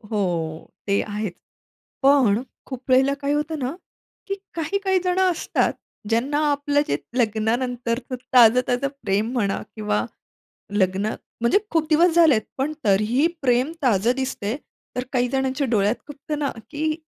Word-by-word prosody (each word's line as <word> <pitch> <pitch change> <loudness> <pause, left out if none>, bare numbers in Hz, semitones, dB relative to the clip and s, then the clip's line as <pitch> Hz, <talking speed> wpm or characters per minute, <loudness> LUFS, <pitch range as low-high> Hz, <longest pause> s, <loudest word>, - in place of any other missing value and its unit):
हो 210 -2 0 0.7
ते 200 0 +3
आहेच. 210 -2 -4 0.7
पण 265 -6 +4 0.2
खूप 260 -1 -7
वेळेला 265 +2 +5
काय 285 +1 0
होतं 300 +1 -1
ना, 260 +4 -2 0.5
की 395 - -1 0.2
काही-काही 380 +4 0
जणं 365 0 +3
असतात. 335 - 0 0.4
ज्यांना 255 +6 +1
आपलं 290 0 +1
जे - - +1 0.2
लग्नानंतरच 240 +2 -1 0.2
ताजं-ताजं 250 +2 +5 0.2
प्रेम 205 +4 0
म्हणा 205 -6 0
किंवा 160 - 0 0.7
लग्न 195 -1 +1 0.4
म्हणजे 235 +11 +4
खूप 320 -2 +1
दिवस 330 +2 +4
झालेत 315 -10 +6 0.2
पण 280 +3 -1
तरीही 215 +8 +3 0.2
प्रेम 255 +2 +2
ताजं 230 -3 +3
दिसतंय, 255 -5 -2 0.4
तर 250 - -1
काही 250 -1 +2
जणांच्या 265 +1 0
डोळ्यात 210 +1 +3
खुपतं 295 +1 -5
ना, 285 -2 0 0.2
की 310 +1 -1
255 Hz, 135 wpm, -23 LUFS, 220-290 Hz, 0.7 s, झालेत